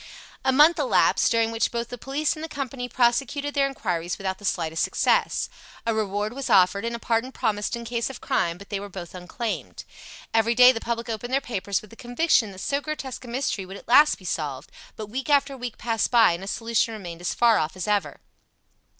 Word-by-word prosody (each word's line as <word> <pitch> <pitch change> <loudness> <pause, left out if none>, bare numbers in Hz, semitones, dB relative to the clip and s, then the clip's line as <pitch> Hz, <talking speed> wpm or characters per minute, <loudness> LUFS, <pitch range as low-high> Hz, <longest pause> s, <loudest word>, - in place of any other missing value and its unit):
A 265 - +3
month 300 +6 +6
elapsed, - - +3
during 230 -1 +2
which 225 0 0
both 235 0 -3
the - - -5
police 285 +5 -1
and 310 - -8
the 325 - -5
company 265 -3 -5
prosecuted 275 +4 +1
their 275 -1 +2
inquiries 180 -10 -3
without 190 -1 -3
the 205 - -10
slightest 160 -3 -1
success. - - +1 0.4
A 230 - +1
reward 210 0 -1
was 275 +1 -5
offered 195 +3 +4
and 235 0 -2
a - - -3
pardon 230 +2 -1
promised 210 -2 -1
in 235 0 -7
case 235 +1 -2
of 270 - -8
crime, 170 0 0
but 200 +2 -13
they 200 - -2
were 205 0 -7
both 175 -3 -8
unclaimed. 185 +5 -5 0.5
Every 225 +1 +3
day 250 +1 +9
the 225 -3 -4
public 235 0 -3
opened 230 +2 -4
their 270 - +4
papers 200 -6 -2
with 215 - -15
the - - -12
conviction 245 -2 +1
that 190 0 -10
so 280 0 -1
grotesque 280 -5 -5
a - - -10
mystery 240 -4 -2
would 190 +1 -9
at - - -15
last 295 +5 +6
be 185 - -16
solved, 145 -6 -4 0.2
but 215 - -6
week 255 +7 -5
after 280 -1 +3
week 245 -3 -6
passed 225 -2 0
by, 235 -6 +6
and 170 +2 -4
a - - -7
solution 225 +1 0
remained 175 -5 -8
as 175 - -2
far 235 -2 +4
off 155 +3 -2
as 185 +1 -5
ever. 200 -9 -1
230 Hz, 220 wpm, -25 LUFS, 200-255 Hz, 0.5 s, day